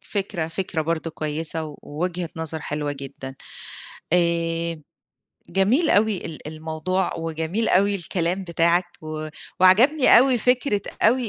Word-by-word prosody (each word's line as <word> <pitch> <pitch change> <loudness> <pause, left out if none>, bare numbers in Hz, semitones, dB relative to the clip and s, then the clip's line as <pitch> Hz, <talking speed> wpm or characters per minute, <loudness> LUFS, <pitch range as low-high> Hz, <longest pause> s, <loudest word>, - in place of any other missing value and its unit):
فكرة، 195 -5 -3
فكرة 165 -1 -2
برضه 165 0 -2
كويسة، 155 0 -4
ووجهة 170 +3 -3
نظر 160 -1 -3
حلوة 150 -1 -3
جدًا، 135 -1 -8 0.8
آآ، 170 -2 +1 0.7
جميل 215 - +3
أوي 210 -1 +3
ال 155 -2 -8
الموضوع 160 +4 -2
وجميل 165 +7 -2
أوي 200 +2 +3
الكلام 180 +1 -2
بتاعك، 170 +1 +3 0.2
و 155 0 -5 0.3
وعجبني 250 +12 +6
أوي 255 -1 +4
فكرة 250 -3 +2 0.2
أوي 240 +1 +3
170 Hz, 115 wpm, -23 LUFS, 160-195 Hz, 0.8 s, وعجبني